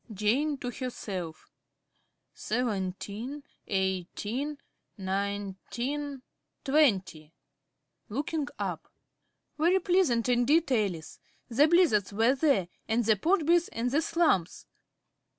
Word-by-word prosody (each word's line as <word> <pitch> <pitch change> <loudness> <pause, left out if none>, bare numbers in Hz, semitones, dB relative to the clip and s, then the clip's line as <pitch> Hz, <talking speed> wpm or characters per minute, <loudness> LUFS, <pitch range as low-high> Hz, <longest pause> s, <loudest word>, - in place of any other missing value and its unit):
~Jane~ 245 +9 +1
(to 245 -2 -4
herself). 195 -11 -6 0.9
Seventeen, 215 +4 -3 0.2
eighteen, 205 - -2 0.4
nineteen, 205 +8 -3 0.4
twenty. 190 - +1 0.7
(Looking 290 +5 -2
up.) - - -4 0.7
Very 345 +4 +4
pleasant 350 -11 +2
indeed, 265 +6 +3
Alice. 195 -9 -1 0.3
The 275 +6 +4
Blizzards 310 - +3
were 225 +5 +4
there, 270 - +2 0.2
and 225 +1 +1
the 220 0 +5
Podbys, 340 - +2
and 240 +2 -2
the 295 +4 +2
Slumphs. 310 - +1
240 Hz, 90 wpm, -29 LUFS, 200-295 Hz, 0.9 s, the